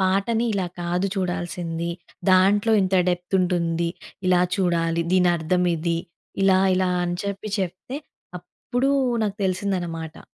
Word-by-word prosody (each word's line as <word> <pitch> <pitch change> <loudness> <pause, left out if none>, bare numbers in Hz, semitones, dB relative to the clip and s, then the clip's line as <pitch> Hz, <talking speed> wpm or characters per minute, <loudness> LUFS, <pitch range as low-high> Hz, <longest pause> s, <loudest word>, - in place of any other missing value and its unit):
పాటని 200 +5 +1
ఇలా 195 -3 -1
కాదు 175 +2 0
చూడాల్సింది. 175 -2 -2 0.4
దాంట్లో 200 +4 +4
ఇంత 190 0 0
డెప్త్ 180 +1 -2
ఉంటుంది. 170 -2 0 0.4
ఇలా 180 -1 +4 0.2
చూడాలి. 170 -3 +1
దీనర్థమిది. 175 -1 +2 0.4
ఇలా, 190 -1 +5 0.2
ఇలా 185 0 +1
అని 175 0 -2
చెప్పి 200 +1 -4
చెప్తే, 190 +8 -4 0.4
అప్పుడూ 245 +9 -2 0.3
నాకు 205 0 -3
తెలిసిందనమాట. 180 -4 -2
180 Hz, 110 wpm, -23 LUFS, 170-195 Hz, 0.4 s, ఇలా